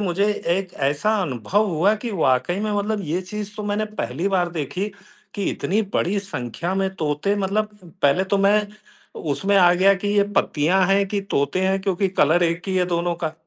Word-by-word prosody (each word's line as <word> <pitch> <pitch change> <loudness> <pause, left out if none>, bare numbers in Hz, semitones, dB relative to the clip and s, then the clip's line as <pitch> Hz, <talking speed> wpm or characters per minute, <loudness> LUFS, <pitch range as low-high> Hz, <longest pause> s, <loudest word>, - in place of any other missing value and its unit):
मुझे 195 0 0 0.3
एक 190 -2 -4 0.2
ऐसा 150 +10 0
अनुभव 175 - 0
हुआ 185 +5 +2
कि 230 +2 -5
वाक़ई 155 -1 +1
में, 215 0 -1
मतलब 205 +1 -1
ये 170 +4 -1
चीज़ 210 +2 -6
तो 210 - -4
मैंने 205 +1 -1 0.2
पहली 135 +12 -2
बार 180 -3 +1
देखी 175 +6 -3 0.5
कि 200 - -2
इतनी 205 +4 -1
बड़ी 200 +4 +1
संख्या 170 - -4
में 195 0 +1
तोते, 155 +6 0
मतलब 210 +2 -1 0.2
पहले 145 +7 +3
तो 195 +1 0
मैं 205 +1 +3 0.6
उसमें 195 +7 0
आ 175 -2 +6
गया 195 +2 +5
कि 200 +2 -3
ये 200 - +6
पत्तियाँ 180 +6 +2
हैं, 195 +1 +3
कि 200 0 -1
तोते 145 -3 -1
हैं? 195 0 +1
क्योंकि 195 0 0
कलर 175 -1 +3
एक 170 +1 0
ही 190 - 0
है 180 -1 +2
दोनों 175 0 0
का। 155 - -1
190 Hz, 190 wpm, -22 LUFS, 170-200 Hz, 0.6 s, आ